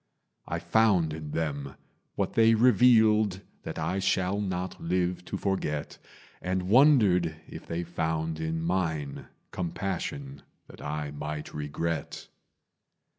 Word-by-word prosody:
I - - -2
found 100 -8 +3
in 75 -1 -6
them 70 -3 -3 0.4
what - - -1
they 115 0 +5
revealed 110 -4 +5 0.2
That - - -6
I 95 - -1
shall 95 +1 +1
not 95 -2 -3
live 90 +1 0
to - - -4
forget, 75 -7 -2 0.4
And 90 +1 -1
wondered 105 - +5
if - - -10
they 85 +1 -2
found 80 -2 -2
in 80 0 -2
mine 80 -5 -2 0.2
Compassion 80 -6 -4 0.2
that - - -14
I 75 0 -3
might 75 +1 -5
regret. 75 +3 -4
85 Hz, 120 wpm, -28 LUFS, 80-95 Hz, 0.4 s, they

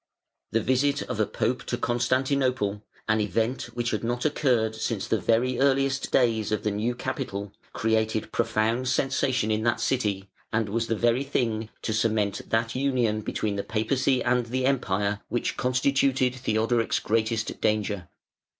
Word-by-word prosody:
The 115 - +2
visit 140 +3 +2
of 125 -4 -5
a 110 - +2
pope 120 +4 -1
to - - -2
Constantinople, 125 -3 0 0.3
an 110 0 +2
event 110 +6 0
which 120 -1 -1
had - - -2
not 120 +3 -2
occurred 125 -7 +2
since 110 -2 -3
the 110 - +1
very 120 +2 +1
earliest 135 0 +2
days 110 -4 +2
of 105 - -1
the 105 - 0
new 110 +4 -1
capital, 100 -4 -4 0.2
created 110 -1 0
profound 115 +4 0
sensation 130 -3 +1
in 110 0 +1
that 115 0 +1
city 105 -6 -1 0.2
and 110 -1 0
was 115 +2 -1
the 115 - 0
very 120 +4 +2
thing 115 -5 -1
to 110 - -1
cement 110 -2 0
that 115 0 +1
union 125 -5 +1
between 105 -1 -2
the 100 - -2
Papacy 125 +4 +1
and 125 -1 +1
the 130 +2 -1
Empire 105 -6 0
which 120 - -1
constituted 130 0 +2
Theodoric's 115 -2 +1
greatest 110 0 -1
danger. 105 -4 0
115 Hz, 155 wpm, -26 LUFS, 110-130 Hz, 0.3 s, The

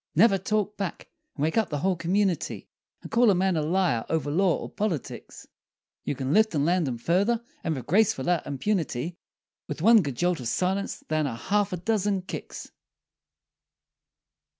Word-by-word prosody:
Never 195 +3 +5
talk 210 +2 -1
back, 195 -4 -5 0.3
and 145 - -3
wake 160 +8 +2
up 220 - -1
the 145 - -2
whole 185 +5 +1
community, 180 0 -1 0.4
And - - -9
call 235 +1 +5
a 195 - +4
man 185 0 +1
a 155 - +1
liar, 155 -7 +1
over 150 -3 -1
law, 180 +2 +2
or - - -6
Politics, 195 - -4 0.6
You - - -2
can 135 +2 -2
lift 220 -3 +3
and 145 -1 +2
land 175 -2 +2
him 125 -2 -3
furder 195 - +1 0.2
and 160 - -1
with 130 - -6
gracefuller 180 -4 +2
impunity 160 0 -2 0.5
With 150 +1 -5
one 225 +1 +7
good 140 -6 -4
jolt 175 +3 0
of 125 - -4
silence 190 +10 -1
than 155 -1 +1
a 120 - -4
half 205 - 0
a 180 - -2
dozen 205 0 0
kicks! 185 - -7
180 Hz, 175 wpm, -26 LUFS, 150-200 Hz, 0.6 s, one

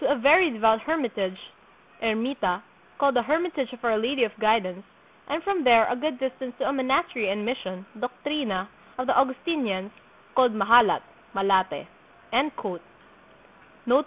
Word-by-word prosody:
a 285 - +2
very 320 +8 +6
devout 225 -1 +3
hermitage 220 - -2 0.7
(Ermita), 225 -4 -1 0.3
called 280 -1 +2
the 245 - +4
Hermitage 300 -1 -1
of 245 - -13
Our 230 -2 +2
Lady 250 +3 0
of 220 - 0
Guidance, 210 -4 +1 0.5
and 310 +3 -2
from 395 -4 0
there 230 -3 +6
a - - +1
good 275 0 -3
distance 260 -1 -4
to - - -1
a 275 - 0
monastery 260 - 0
and 210 +2 -2
mission 190 -7 -4
(doctrina) 245 -5 -3 0.3
of 255 - -2
the 260 - +3
Augustin 270 +4 +1
ians, 195 -1 -3 0.4
called 250 -3 +4
Mahalat 215 +2 +5 0.3
(Malate)." 195 -1 +1
245 Hz, 135 wpm, -25 LUFS, 215-275 Hz, 0.7 s, very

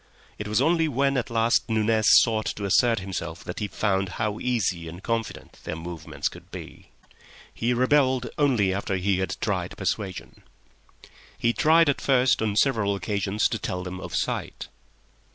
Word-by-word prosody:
It 105 - -4
was 105 0 +2
only 165 -1 +3
when 140 0 +1
at 125 - -1
last 115 +1 +2
Nunez 110 0 +2 0.2
sought 110 -2 -1
to 100 - -4
assert 115 +4 +3
himself 85 -2 -5
that - - -6
he 105 - -2
found 95 -2 0
how 105 -1 -1
easy 95 -9 -1
and 85 +4 -9
confident 115 -1 -4
their - - -4
movements 80 -1 -5
could - - -10
be. - - -10 0.6
He 120 +2 -1
rebelled 130 0 +2
only 120 -10 +3
after 95 0 -2
he 95 0 0
had 95 - -3
tried - - -2
persuasion. 95 -3 -4 1.0
He 120 0 +1
tried 165 +4 +4
at 140 - +1
first 130 -2 +3
on 105 -2 0
several 110 -5 +2
occasions 100 +2 0
to 115 - -3
tell 90 -1 -3
them 90 0 -6
of - - -6
sight. - - -3
110 Hz, 165 wpm, -25 LUFS, 95-125 Hz, 1.0 s, tried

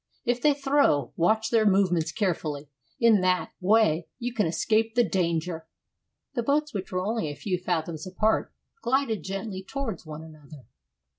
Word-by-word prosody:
If 245 0 0
they 295 +1 +4
throw, 275 - +2
watch 220 +6 +2
their 225 -2 +4
movements 180 -5 +2
carefully; 155 -7 -2 0.3
in 225 -4 +5
that 185 0 +1
way 180 -5 +3
you 245 0 -4
can 215 -7 +1
escape 220 +7 +1
the 240 - +5
danger." 170 -2 -1 0.7
The 245 - -1
boats, 290 +4 0
which 195 -2 -5
were 185 0 -1
only 215 -7 -1
a 145 - -6
few 180 +3 -2
fathoms 170 -2 -3
apart, 215 +4 0 0.3
glided 255 -4 0
gently 195 0 -4
towards 225 -2 -5
one 155 0 -8
another. 155 -3 -14
190 Hz, 155 wpm, -26 LUFS, 165-230 Hz, 0.7 s, in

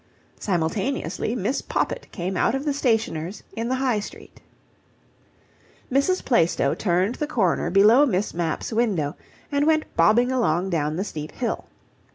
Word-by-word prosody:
Simultaneously 190 +8 -1
Miss - - -1
Poppit - - -3
came 185 0 -4
out 235 - +2
of 270 +2 -3
the 290 - +1
stationer's 220 - -1
in 230 +1 -3
the 260 - +1
High 255 -4 +1
Street. 205 - -10 1.5
Mrs. 280 +8 +1
Plaistow 165 - +2
turned 185 +4 +1
the 300 - 0
corner 195 - +1
below 215 +10 +6
Miss 205 -3 -1
Mapp's 170 +5 -2
window, 195 -11 0 0.4
and 285 +1 +1
went 310 -1 +3
bobbing 230 +9 +4
along 190 -7 +1
down 155 -2 0
the 185 - -1
steep 155 -6 -6
hill. 235 -3 -3
210 Hz, 145 wpm, -24 LUFS, 170-255 Hz, 1.5 s, below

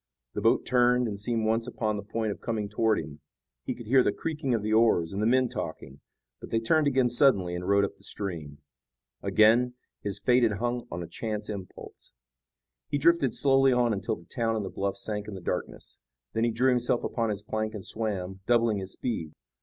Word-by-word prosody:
The - - -3
boat - - +3
turned, 125 0 +3
and 100 -2 -4
seemed 115 +1 -1
once 115 +2 +1
upon 110 -3 -2
the 100 - -4
point 110 +1 -2
of - - -7
coming 110 -3 -2
toward 110 +1 +1
him. 75 -2 -6 0.5
He - - -2
could 120 - -10
hear 130 +4 +5
the - - +2
creaking 150 -6 -2
of 110 - -2
the 110 +1 0
oars 110 -7 +3
and 100 - -2
the 110 - +2
men 130 +1 +4
talking, 75 - -6 0.4
but - - -10
they 115 - +1
turned 150 +7 +2
again 130 -2 +3
suddenly 120 -8 +3
and 90 +2 -4
rowed 100 0 +4
up - - -8
the - - -23
stream. 80 -8 -5 0.6
Again, 120 +3 +4 0.3
his 100 0 -3
fate 125 +5 +3
had 115 -3 +3
hung 120 +3 -2
on 85 +1 -5
a - - -7
chance 105 +4 -4
impulse. 100 -3 -9 0.8
He 145 - 0
drifted 145 -4 +3
slowly 135 -1 +4
on 120 -2 +2
until 100 -3 -2
the 85 - -16
town 115 0 -1
and 105 -2 -2
the 95 - -6
bluffs 100 0 -3
sank 105 -1 -3
in 105 - -6
the - - -6
darkness. 85 - -5 0.3
Then 115 +1 +1
he 120 - +1
drew 125 +4 +2
himself 125 -1 +1
upon 115 -2 -1
his 105 -1 -3
plank 110 0 -3
and 100 - -7
swam, 95 -4 -3
doubling 115 -3 +3
his 95 0 -5
speed. 85 -11 -4
110 Hz, 215 wpm, -28 LUFS, 100-120 Hz, 0.8 s, hear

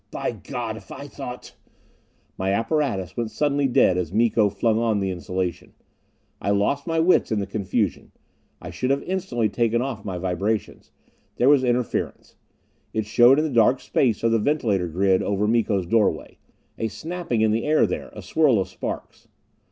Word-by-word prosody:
By - - -3
God, - - -5
if - - -14
I - - -7
thought - - -8 0.4
" - - -40
My 95 +1 0
apparatus 115 - -1
went 115 -2 -2
suddenly 145 +2 +1
dead 95 -7 +3
as 85 -3 -3
Miko 110 0 +3
flung 110 +3 +1
on 115 -3 +1
his 95 -1 -1
insulation. 90 0 -4 0.7
I - - -2
lost 105 +9 +1
my 165 -1 0
wits 170 -5 +3
in 110 - +1
the 100 - -2
confusion; 100 +1 -2 0.5
I - - -8
should 130 - -2
have 140 +1 +1
instantly 175 - -1
taken 115 +2 0
off 120 -4 -4
my 95 -3 -4
vibrations. 95 +4 -3 0.4
There 125 - +3
was 145 -3 +5
interference; 125 -2 -2 0.6
it 110 -1 0
showed 120 +5 +5
in 155 - +2
the 155 - -2
dark 120 +3 +4
space 115 -6 0
of 115 - +3
the 115 - +3
ventilator 105 - 0
grid 95 +3 +2
over 100 +1 0
Miko's 110 -4 +1
doorway; 100 -4 0 0.4
a 110 - 0
snapping 160 - -3
in 110 -1 +3
the 115 +2 0
air 155 +1 +4
there, - - -4
a - - -9
swirl 150 -7 +3
of 95 - -2
sparks. - - -7
115 Hz, 175 wpm, -23 LUFS, 100-130 Hz, 0.7 s, was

